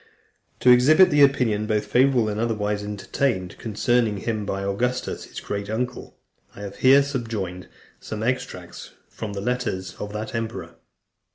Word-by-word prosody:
To 125 Hz, -, +7 dB
exhibit 155 Hz, +9 st, +6 dB
the 145 Hz, 0 st, +4 dB
opinion, 120 Hz, -7 st, +3 dB
both 105 Hz, -1 st, 0 dB
favourable 125 Hz, +1 st, +3 dB
and 105 Hz, 0 st, -2 dB
otherwise, 105 Hz, -3 st, -1 dB
entertained 105 Hz, -1 st, -2 dB
concerning 115 Hz, 0 st, +1 dB
him 105 Hz, 0 st, -3 dB
by 100 Hz, 0 st, -2 dB
Augustus, 125 Hz, +6 st, -2 dB
his -, -, -8 dB
great 100 Hz, 0 st, -5 dB
uncle, 125 Hz, +3 st, -4 dB, 0.4 s
I -, -, -10 dB
have 100 Hz, -1 st, -7 dB
here 135 Hz, +2 st, +6 dB
subjoined 115 Hz, -10 st, -4 dB, 0.3 s
some 110 Hz, 0 st, -6 dB
extracts 125 Hz, +2 st, -4 dB, 0.2 s
from 110 Hz, -2 st, -6 dB
the 100 Hz, -, -4 dB
letters 120 Hz, -5 st, -2 dB
of 105 Hz, -, -5 dB
that 105 Hz, +1 st, -5 dB
emperor. 115 Hz, 0 st, -4 dB
110 Hz, 150 wpm, -24 LUFS, 105-125 Hz, 0.4 s, To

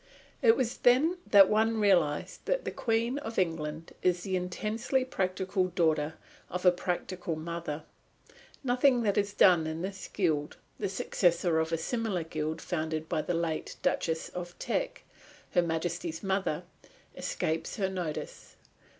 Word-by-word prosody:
It 225 Hz, 0 st, +6 dB
was 250 Hz, -3 st, -1 dB
then 300 Hz, +9 st, +4 dB
that 200 Hz, -2 st, +8 dB
one 220 Hz, +2 st, +2 dB
realised 175 Hz, -8 st, +2 dB
that -, -, 0 dB
the -, -, -2 dB
Queen 235 Hz, +3 st, 0 dB
of 230 Hz, -6 st, -6 dB
England 165 Hz, -3 st, -2 dB
is 180 Hz, -1 st, +2 dB
the 190 Hz, -1 st, -1 dB
intensely 215 Hz, +8 st, -1 dB
practical 190 Hz, -3 st, 0 dB
daughter 160 Hz, -4 st, +1 dB, 0.3 s
of 180 Hz, +1 st, -4 dB
a 180 Hz, -, +9 dB
practical 175 Hz, -1 st, -3 dB
mother. 160 Hz, -1 st, -5 dB, 0.8 s
Nothing 250 Hz, -1 st, +3 dB
that 205 Hz, -2 st, +2 dB
is 200 Hz, 0 st, +1 dB
done 175 Hz, -5 st, +5 dB
in 160 Hz, +2 st, -4 dB
this 190 Hz, 0 st, -5 dB
Guild, 155 Hz, -6 st, -1 dB, 0.2 s
the 200 Hz, -, -1 dB
successor 175 Hz, -3 st, +2 dB
of 160 Hz, 0 st, -1 dB
a 165 Hz, -, +1 dB
similar 205 Hz, 0 st, -1 dB
guild 160 Hz, 0 st, -3 dB
founded 160 Hz, -2 st, -2 dB
by 155 Hz, -, 0 dB
the 175 Hz, -, -2 dB
late 165 Hz, -2 st, -2 dB
Duchess 160 Hz, -1 st, 0 dB
of 175 Hz, 0 st, -7 dB
Teck, -, -, -2 dB, 0.5 s
Her 175 Hz, -, +4 dB
Majesty's 170 Hz, 0 st, -2 dB
mother, 190 Hz, -5 st, 0 dB, 0.5 s
escapes 160 Hz, +1 st, -2 dB
her 195 Hz, -3 st, 0 dB
notice. 180 Hz, -5 st, -5 dB
180 Hz, 145 wpm, -30 LUFS, 160-210 Hz, 0.8 s, a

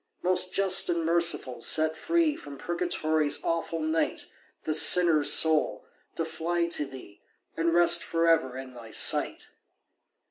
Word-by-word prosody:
"Most 185 Hz, 0 st, +1 dB
Just 195 Hz, -1 st, +2 dB
and 170 Hz, -1 st, -2 dB
Merciful, 165 Hz, -7 st, -1 dB
set 155 Hz, +5 st, +1 dB
free 330 Hz, -, -1 dB
From 145 Hz, -, -12 dB
Purgatory's 160 Hz, -3 st, -2 dB
awful 165 Hz, 0 st, -3 dB
night 160 Hz, +1 st, -2 dB, 0.4 s
This 155 Hz, 0 st, +4 dB
sinner's 165 Hz, -5 st, +4 dB
soul, 160 Hz, -1 st, +2 dB, 0.3 s
to 165 Hz, -, -3 dB
fly 165 Hz, +2 st, -3 dB
to 150 Hz, -3 st, -1 dB
Thee, 130 Hz, -7 st, -14 dB, 0.3 s
And 165 Hz, +1 st, -1 dB
rest 170 Hz, 0 st, +4 dB
for 165 Hz, 0 st, -2 dB
ever 130 Hz, -6 st, 0 dB
in 130 Hz, -1 st, -10 dB
Thy 115 Hz, -2 st, -13 dB
sight." -, -, 0 dB
165 Hz, 140 wpm, -26 LUFS, 150-175 Hz, 0.4 s, This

